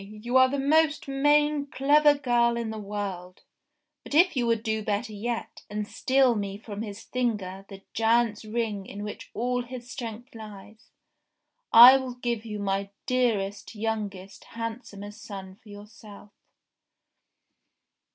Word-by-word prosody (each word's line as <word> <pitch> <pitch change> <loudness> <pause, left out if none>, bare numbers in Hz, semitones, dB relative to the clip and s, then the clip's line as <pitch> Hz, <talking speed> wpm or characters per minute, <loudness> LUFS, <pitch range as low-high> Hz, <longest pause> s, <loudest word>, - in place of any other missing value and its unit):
You 215 +5 -6
are 260 0 +6
the 280 - -2
most 300 +2 +2
main 290 +1 +2
clever 290 +2 +4
girl 240 -3 +2
in 230 -2 -3
the 220 - -6
world; 195 -3 -6 0.6
but - - -6
if 350 +2 +5
you 245 -2 0
would 230 -1 +1
do 220 -1 -1
better 215 +2 -2
yet, 230 +3 -4
and 210 0 -4
steal 260 +1 +2
me 200 -2 -4
from 205 -1 -7
his 205 -2 -7
finger 200 -6 -3
the 195 -1 -11
giant's 225 -1 +2
ring 215 -3 -3
in 205 +1 -7
which 210 - -7
all 245 +2 0
his 245 0 -9
strength 235 -1 -7
lies, 215 0 -12 0.8
I 245 +3 +10
will 260 -2 -5
give 240 -2 -3
you 210 -2 -5
my 195 0 -2 0.2
dearest, 220 -5 -1
youngest, 205 -3 -4
handsomest 225 -2 -7
son 190 -2 -8
for 225 -1 -19
yourself." 205 0 -13
225 Hz, 140 wpm, -27 LUFS, 205-250 Hz, 0.8 s, I